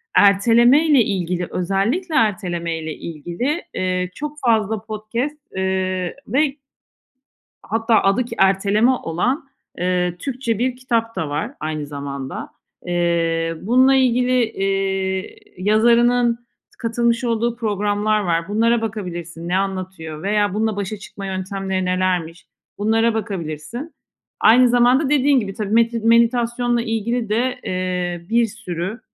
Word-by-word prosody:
Ertelemeyle 240 +8 +5
ilgili 180 -3 -2
özellikle 200 - -1
ertelemeyle 175 - -1
ilgili, 175 - -4
eee, 185 -1 -1
çok 300 0 -5
fazla 220 -2 +2
podcast, 220 +6 -4 0.2
eee, 185 -1 -1
ve 275 +5 +1 1.1
Hatta 225 0 +1
adı 195 +6 +2
ki - - -7
"Erteleme" 200 +4 +3
olan, 250 - -1 0.4
ııı, 180 -1 0
Türkçe 245 -2 -2
bir 250 +1 0
kitap 230 -3 -1
da 155 - -2
var 145 +2 -3
aynı 155 -1 -3
zamanda. 140 -2 -6 0.4
Eee, 170 -1 0
bununla 255 +5 +4
ilgili, 250 -2 +2 1.1
ııı, 185 - -6
yazarının 235 +2 +4
t 240 - -32 0.4
katılmış 235 +1 0
olduğu 235 0 0
programlar 210 -1 0
var. 170 -1 -1
Bunlara 230 +3 +2
bakabilirsin, 175 -6 -5
ne 180 - +1
anlatıyor 185 -5 -4
veya 205 -1 +1
bununla 220 0 0
başa 205 +1 -3
çıkma 200 0 -9
yöntemleri 190 0 -3
nelermiş, 180 -2 -1 0.3
bunlara 225 +2 +2
bakabilirsin. 210 - -5 0.5
Aynı 245 +3 +6
zamanda 245 +4 +3
dediğin 280 -2 +4
gibi 195 -3 -5
tabii 210 0 -4
meti 230 0 +3
meditasyonla 235 +1 +2
ilgili 225 +1 -2
de, 245 +4 0
ııı, 180 -1 -3
bir 230 0 +3
sürü 200 -1 -5
215 Hz, 120 wpm, -20 LUFS, 185-235 Hz, 1.1 s, Aynı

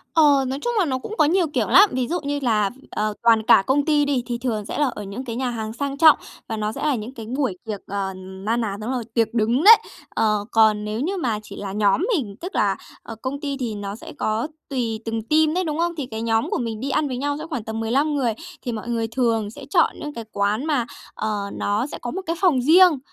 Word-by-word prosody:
Ờ, 290 -4 +5
nói 265 +2 -3
chung 480 - -1
là 365 - +3
nó 260 -3 -1
cũng 430 - -7
có - - +5
nhiều 345 +3 +2
kiểu - - +1
lắm. 410 - +7
Ví 255 -1 0
dụ 350 +5 -1
như 285 0 -2
là, 215 -5 +2 0.2
ờ, 215 0 -1
toàn 225 -2 +5
cả 195 - +6
công 280 +2 +2
ty 295 -2 +3
đi, 270 -4 0
thì 240 -1 -3
thường 230 -4 -2
sẽ - - -5
là 295 - +4
ở 210 - -6
những 205 +7 -6
cái 230 -2 -4
nhà 255 0 -1
hàng 220 -2 -4
sang 280 +2 -3
trọng 315 0 +7 0.3
và 225 - -3
nó 210 0 -1
sẽ - - -7
là 295 - +2
những 230 +3 -6
cái 225 -4 -8
buổi 250 -4 -2
tiệc, 210 -3 -4
à, 195 -1 -3
na 190 +4 -3
ná 210 -4 -2
đúng 235 +4 -3
rồi, 250 -2 -2
tiệc 225 -2 +1
đứng 235 +5 +1
đấy. 445 +4 +11 0.3
Ờ, 210 -2 +1
còn 215 -2 +4
nếu 215 +2 -3
như 375 +8 -1
mà 230 -10 -1
chỉ - - -10
là 200 -1 -5
nhóm 205 - +2
mình, 220 - -3
tức 365 +3 -6
là, - - +2 0.3
ờ, 225 - -8
công 270 +2 -3
ty 280 -2 -3
thì 235 -4 -3
nó 200 0 -5
sẽ 230 - -10
có 215 +5 -1 0.2
tùy 235 -5 -2
từng 225 0 -2
team 310 0 +4
đấy, 365 +2 0
đúng 310 -3 -2
không? 345 0 +1
Thì 285 - -2
cái 220 - -4
nhóm 225 0 +1
của - - 0
mình 225 -3 -3
đi 270 - -3
ăn 290 +2 +1
với 255 -2 -3
nhau 285 +2 -1
sẽ 310 - -5
khoảng 250 -8 -3
tầm 220 0 -5
15 275 +7 +1
người, 250 -5 +1 0.3
thì 245 - -3
mọi 225 +1 -5
người 230 -1 -1
thường 225 -3 0
sẽ - - -10
chọn 335 +1 +3
những 295 0 -6
cái 230 - -6
quán 205 +6 0
mà, 285 -7 +1 0.3
ờ, 210 -2 -2
nó 210 +6 -1
sẽ - - -7
có 240 - -4
một 380 - -4
cái 335 +1 -1
phòng 310 -10 +4
riêng, 330 +1 +6
240 Hz, 265 wpm, -22 LUFS, 215-290 Hz, 0.3 s, đấy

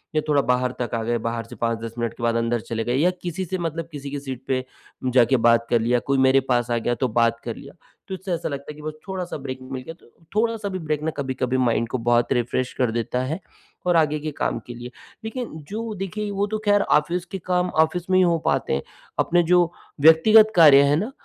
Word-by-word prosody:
या 155 - +3
थोड़ा 145 -2 +3
बाहर 125 -1 +1
तक 120 - -2
आ 115 - -1
गए 120 +1 0
बाहर 115 0 -3
से - - -9
5-10 115 -1 -2
मिनट 115 -1 -2
के - - -10
बाद 115 0 +1
अंदर 115 +1 0
चले 115 +1 -3
गए 120 +2 -1
या 155 +7 +3
किसी 180 +2 -3
से 185 +2 -3
मतलब 165 -1 -3
किसी 145 -2 -7
की 145 - -3
सीट 130 -2 -7
पे 130 -1 0 0.5
जाके 130 +1 +5
बात 115 0 +4
कर 120 - +3
लिया, 120 +2 +2
कोई 140 +3 -1
मेरे 130 0 +5
पास 120 -1 +1
आ 120 - +2
गया, 120 +1 -1
तो 130 - 0
बात 115 0 +1
कर 115 -2 -4
लिया। 140 - -12 0.3
तो 190 - -6
इससे 190 0 -4
ऐसा 165 - -2
लगता 140 0 -6
है - - -11
कि 150 - -12
बस 155 0 -5
थोड़ा-सा 185 -4 -4
ब्रेक 130 -2 -6
मिल 130 0 -6
गया 165 - -8
तो - - -22 0.3
थोड़ा-सा 220 -1 0
भी 185 -1 -4
ब्रेक 155 -2 -2
ना 160 - 0
कभी-कभी 130 -2 -1
माइन्ड 115 -2 +1
को 130 - -1
बहुत 120 0 +2
रिफ्रेश 125 +1 -1
कर 125 -3 +1
देता 120 +2 -2
है 150 +7 -3 0.5
और 175 -1 +3
आगे 155 -1 +2
के 155 +1 -4
काम - - -1
के 120 - -6
लिए। 120 +1 -8 0.3
लेकिन 240 +2 -4 0.2
जो 220 +1 -4
देखिए, 205 +2 -4
वो 200 +1 -1
तो 215 +1 -2
खैर 205 0 +4
ऑफ़िस 170 +4 +1
के 195 +1 -6
काम 180 0 +1
ऑफ़िस 165 +2 +1
में 185 - +4
ही 185 - +5
हो 170 -2 +3
पाते - - +1
हैं, 70 - -1 0.4
अपने 175 0 +3
जो 175 0 +3 0.3
व्यक्तिगत 215 +8 +7
कार्य 150 -5 +8
हैं 140 +1 +3
ना, 210 +10 -2
140 Hz, 245 wpm, -23 LUFS, 120-175 Hz, 0.5 s, कार्य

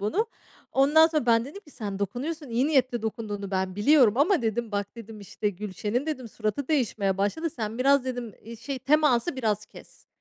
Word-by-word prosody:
bunu. 295 - 0 0.5
Ondan 295 +4 +6
sonra 310 -6 -1
ben 230 -1 +4
dedim 295 +10 -9
ki, 320 - -19
"Sen 205 -7 -5
dokunuyorsun, 275 - -4
iyi 240 +4 +2
niyetle 255 -6 +1
dokunduğunu 205 -3 -4
ben 190 -1 -2
biliyorum 235 0 +5
ama" 310 +2 +3
dedim 225 0 -2
"bak" 200 +2 -3
dedim 225 -2 -10
"işte, 205 +1 -3
Gülşen'in" 210 - -3
dedim, 260 -7 -4
"suratı 215 +7 -3
değişmeye 220 -10 0
başladı. 265 +12 -1
Sen 225 -2 -5
biraz" 275 0 +4
dedim, 245 -4 -5
"iii 230 +2 -9
şey 260 +4 -5
teması 290 0 +2
biraz 215 -4 -1
kes. - - -16
235 Hz, 180 wpm, -26 LUFS, 210-280 Hz, 0.5 s, Ondan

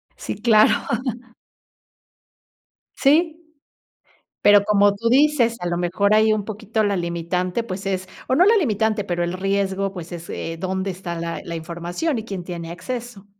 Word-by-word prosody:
Sí, - - -5
claro. 220 -2 +5 2.2
Sí. 315 +3 +3 1.1
Pero 205 -1 +7
como 205 -1 +4
tú 230 +3 -1
dices, 260 -3 +3
a 175 - -4
lo 175 0 -1
mejor 185 +4 +1
hay 215 0 +5
un 210 - -3
poquito 220 +1 -2
la 200 -1 +1
limitante, 175 +4 -2
pues 195 -3 -6
es 190 -1 -2 0.2
o 260 - +3
no 345 - +5
la 440 +4 +5
limitante, 220 - +1
pero 175 -3 -2
el 175 - -2
riesgo, 195 +1 -1
pues 175 -1 -8
es, 170 -1 -8
eh, 165 0 -5
dónde 190 +1 -2
está 180 -2 -6
la 170 0 -4
la 170 - -5
información 175 - -3
y 220 - -5
quién 195 -5 -6
tiene 170 -2 -6
acceso. 215 +3 -6
195 Hz, 160 wpm, -22 LUFS, 175-220 Hz, 2.2 s, Pero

